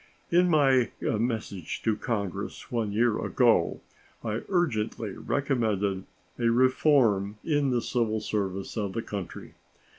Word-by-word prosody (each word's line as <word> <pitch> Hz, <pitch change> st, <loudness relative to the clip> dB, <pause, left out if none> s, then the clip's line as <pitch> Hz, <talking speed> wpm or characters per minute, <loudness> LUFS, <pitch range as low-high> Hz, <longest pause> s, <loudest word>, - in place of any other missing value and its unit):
In 175 Hz, +1 st, +4 dB
my 135 Hz, -6 st, +4 dB
message 110 Hz, -6 st, -2 dB
to 110 Hz, -2 st, +2 dB
Congress 105 Hz, -4 st, -4 dB
one 115 Hz, -4 st, -1 dB
year 115 Hz, +1 st, +1 dB
ago -, -, +2 dB, 0.4 s
I 110 Hz, -1 st, -2 dB
urgently 115 Hz, -, 0 dB
recommended 105 Hz, -7 st, -1 dB, 0.3 s
a 120 Hz, -1 st, +3 dB
reform 120 Hz, -5 st, +3 dB
in 145 Hz, -3 st, +1 dB
the 120 Hz, -2 st, 0 dB
civil 110 Hz, -3 st, 0 dB
service 100 Hz, -3 st, -3 dB
of 100 Hz, -3 st, -2 dB
the 115 Hz, -, -3 dB
country. 100 Hz, -4 st, -7 dB
115 Hz, 120 wpm, -27 LUFS, 105-130 Hz, 0.4 s, In